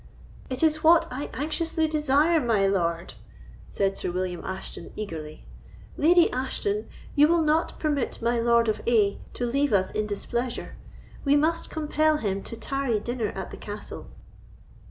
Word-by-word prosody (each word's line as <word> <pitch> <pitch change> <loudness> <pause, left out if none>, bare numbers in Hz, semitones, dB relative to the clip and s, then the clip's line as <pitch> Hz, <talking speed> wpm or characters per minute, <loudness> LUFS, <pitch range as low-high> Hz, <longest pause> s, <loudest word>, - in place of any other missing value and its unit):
"It 260 +3 -2
is 310 -1 +2
what 330 +1 +6
I 265 +3 -4
anxiously 320 +2 -1
desire, 305 +2 +3
my 220 -6 +2
lord," 170 -3 0 0.5
said 195 -1 0
Sir - - -3
William 180 -1 -3
Ashton, 190 0 -6
eagerly. 160 -7 -7 0.5
"Lady 340 +3 +5
Ashton, 400 +12 -2 0.3
we 295 0 +7
will 335 0 +3
not 310 +2 +1
permit 295 -4 -1
my 235 +1 +1
Lord 235 0 +3
of 215 - 0
A—— 210 -4 +3 0.2
to 245 - -2
leave 275 +4 +1
us 190 -1 +2
in 215 0 -1
displeasure. 235 +4 -3 0.5
We 280 0 +4
must 320 +3 +1
compel 310 0 +1
him 200 -7 -2
to 230 - -7
tarry 260 -1 -1
dinner 235 0 -2
at 190 -1 -5
the - - -8
castle." 205 0 -8
250 Hz, 155 wpm, -26 LUFS, 205-310 Hz, 0.5 s, we